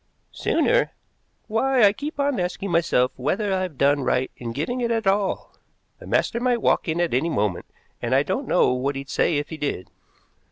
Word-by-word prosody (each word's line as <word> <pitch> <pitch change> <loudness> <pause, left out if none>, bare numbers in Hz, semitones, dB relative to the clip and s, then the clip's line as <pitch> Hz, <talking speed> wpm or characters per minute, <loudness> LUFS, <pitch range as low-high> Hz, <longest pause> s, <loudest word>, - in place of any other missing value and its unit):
"Sooner? - - +1 0.5
Why, 250 +3 +2
I 200 -1 +6
keep 290 +6 -6
on 280 -5 +1
asking 180 +2 -3
myself 165 -7 +2
whether 195 - -1
I've 185 -6 -2
done 145 +2 +3
right 130 0 0
in 120 -2 -6
giving 160 - -3
it 235 - 0
at 225 -2 0
all. 195 0 0 0.5
The - - -12
master 235 - +1
might 245 -1 +1
walk - - +2
in 160 +1 -1
at 175 -5 0
any 140 +7 +1
moment, 105 - -1 0.3
and 120 +2 0
I 135 - +4
don't 260 - -3
know 180 - +3
what 135 +2 -1
he'd 135 0 -6
say 160 - +2
if 145 0 -3
he 160 - -6
did." 145 -11 -4
175 Hz, 195 wpm, -23 LUFS, 135-225 Hz, 0.5 s, I